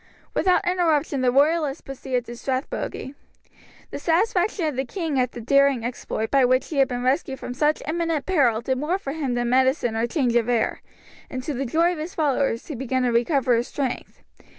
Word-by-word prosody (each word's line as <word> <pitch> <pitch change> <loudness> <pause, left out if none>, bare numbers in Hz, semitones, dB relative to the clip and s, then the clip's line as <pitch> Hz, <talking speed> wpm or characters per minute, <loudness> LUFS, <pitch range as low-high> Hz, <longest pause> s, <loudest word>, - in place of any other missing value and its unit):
Without 365 -2 +2
interruption 320 -6 +1
the 250 -1 +3
royalists 290 +1 +2
proceeded 255 -2 -3
to 235 +1 -8
Strathbogie. 265 +1 -4 0.8
The - - -5
satisfaction 360 +1 +1
of 300 -3 -1
the 265 - 0
king 315 -1 -2
at 250 -1 0
the 240 - -7
daring 275 0 +3
exploit 235 -2 -3
by 275 -1 +4
which 255 +1 +2
he 305 - -4
had 270 -1 +5
been 245 -1 -4
rescued 265 +1 0
from 245 - -6
such 300 +4 +1
imminent 330 -2 -1
peril 260 -12 +2
did 260 +1 -1
more 320 +6 0
for 280 -8 -5
him 280 -6 -2
than 240 0 0
medicine 260 -2 +2
or 225 +1 0
change 245 -2 0
of 240 0 +2
air, 235 -2 0 0.5
and 255 -1 -5
to 300 - -3
the 270 +1 -2
joy 335 +7 +2
of 350 - -5
his 320 +3 -6
followers 275 -6 0
he 310 - -6
began 260 0 -1
to 245 - +2
recover 245 +1 +2
his 235 +2 0
strength. 265 -3 -4
270 Hz, 200 wpm, -24 LUFS, 245-310 Hz, 0.8 s, had